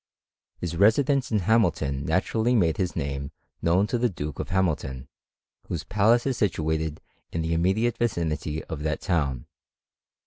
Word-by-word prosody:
His 85 -1 -4
residence 130 - +3
in 110 - +3
Hamilton 85 -10 +1
naturally 115 +2 +1
made 85 -8 +2
his 90 -2 -1
name 70 -2 -3 0.3
known 90 +4 +3
to 120 +3 -1
the 120 0 +2
Duke 75 -6 -6
of - - -4
Hamilton, 75 -8 -1 0.6
whose 85 - -3
palace 110 +4 +3
is 135 -3 0
situated 80 -5 0 0.3
in 80 - -2
the 80 +1 -1
immediate 100 +8 +1
vicinity 80 -8 -1
of 75 -2 -6
that 75 0 -2
town. 70 -10 -1
85 Hz, 145 wpm, -26 LUFS, 75-110 Hz, 0.6 s, residence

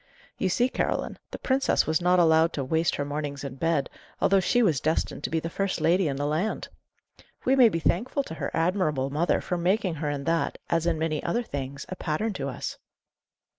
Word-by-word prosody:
You 190 - +1
see, 245 +7 +2
Caroline, - - -2
the - - -6
princess 265 0 +1
was 160 +2 +1
not 180 +1 +4
allowed 165 -1 +4
to 140 - -2
waste 160 +5 +1
her 145 - -2
mornings 145 -1 -4
in 140 -2 -5
bed, 160 -1 +1 0.3
although 195 0 +4
she 245 +6 +2
was 160 -10 +3
destined 160 +1 -1
to - - -1
be 165 - 0
the 165 - -4
first 195 +3 -2
lady 175 +1 +3
in 140 - -1
the 145 +1 -2
land. 160 +9 -1 0.8
We 265 - +4
may 250 -4 +7
be 165 - -2
thankful 230 - 0
to 160 - -8
her - - -3
admirable 165 -6 0
mother 160 +5 +1
for 180 - -2
making 185 +1 +1
her 150 - 0
in 145 -1 -3
that, 165 +2 0
as 170 0 +1
in 165 -2 +1
many 155 -1 -1
other 235 +8 0
things, 140 - -5
a 185 - -5
pattern 185 +7 -2
to 140 -6 -3
us." 130 - -5
165 Hz, 210 wpm, -26 LUFS, 150-185 Hz, 0.8 s, may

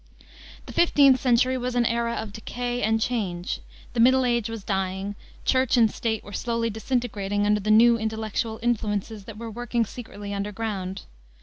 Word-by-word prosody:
The - - -9
15th 280 -6 +5
century 255 +1 +3
was 250 0 -3
an 240 -1 +3
era 235 0 0
of 220 -2 -5
decay 245 +2 -4
and 220 +1 +2
change. 195 -7 -2 0.3
The 240 - -2
Middle 260 +2 +5
Age 235 -3 +1
was 225 -3 -6
dying, 190 0 -2 0.3
Church 260 -1 +3
and 225 -3 +5
State 220 -2 -2
were 205 - -11
slowly 230 0 -1
disintegrating 210 -3 -1
under 210 0 +3
the 210 +1 -3
new 230 +2 +6
intellectual 220 0 -2
influences 215 -3 -1
that 220 -1 -9
were 230 0 -6
working 240 0 -1
secretly 205 -3 -8
under 200 +1 -3
ground. 195 -3 -4
225 Hz, 170 wpm, -25 LUFS, 205-240 Hz, 0.3 s, new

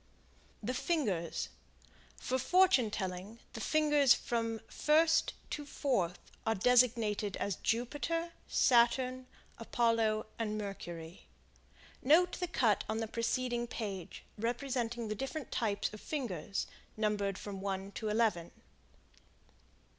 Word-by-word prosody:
The 245 +5 -1
Fingers. 215 - -1 0.7
For 260 +1 -1
fortune 360 - +4
telling 190 +2 -4 0.2
the 225 - -6
fingers 295 -4 +4
from 230 -1 -2
first 320 +2 +3 0.2
to 295 - -3
fourth 245 - 0 0.3
are 225 - +1
designated 225 -2 +3
as 200 - -2
Jupiter, 295 +8 -1 0.2
Saturn, 255 +1 +3 0.3
Apollo 230 -2 +1
and 215 -2 -1
Mercury. 175 - -7 0.7
Note 340 +7 +4
the 360 - -1
cut 240 -11 +2
on 220 +1 -1
preceding 240 +1 -1
page, 200 -7 -5 0.2
representing 240 0 -2
the 215 - -1
different 270 +5 -5
types 210 -3 -1
of 215 - -9
fingers, 225 - -3 0.3
numbered 205 -3 0
from 195 -2 -6
one 195 0 -3
to 215 +2 -4
eleven. 210 -6 +1
230 Hz, 110 wpm, -33 LUFS, 205-260 Hz, 0.7 s, fortune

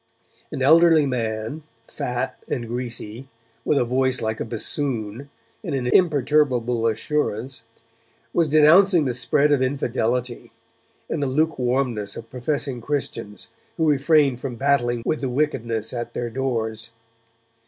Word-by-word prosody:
An 130 - -3
elderly 160 +1 +6
man, 115 +2 -3 0.3
fat 125 +1 -3
and 120 -3 -3
greasy, 120 0 -3 0.4
with 150 - +1
a 125 - +2
voice 130 +1 +1
like 110 0 -3
a - - -2
bassoon, 120 +1 -2 0.3
and - - -3
an 130 -2 -2
imperturbable 130 -6 +2
assurance, 115 0 -2 0.7
was 165 -3 +2
denouncing 160 +3 +5
the 125 - 0
spread 140 +4 +2
of 140 -3 +3
infidelity, 125 -2 -1 0.6
and 155 - -3
the 140 - 0
lukewarmness 130 -7 0
of 115 - -10
professing 130 0 -2
Christians, 125 -6 -4 0.3
who 160 -2 +1
refrained 140 -3 +3
from 130 -3 -4
battling 120 -3 +1
with 155 - -1
the 135 - -1
wickedness 120 -5 -1
at 120 -1 -5
their 120 -1 -3
doors. 115 -3 -3
130 Hz, 130 wpm, -23 LUFS, 115-145 Hz, 0.7 s, elderly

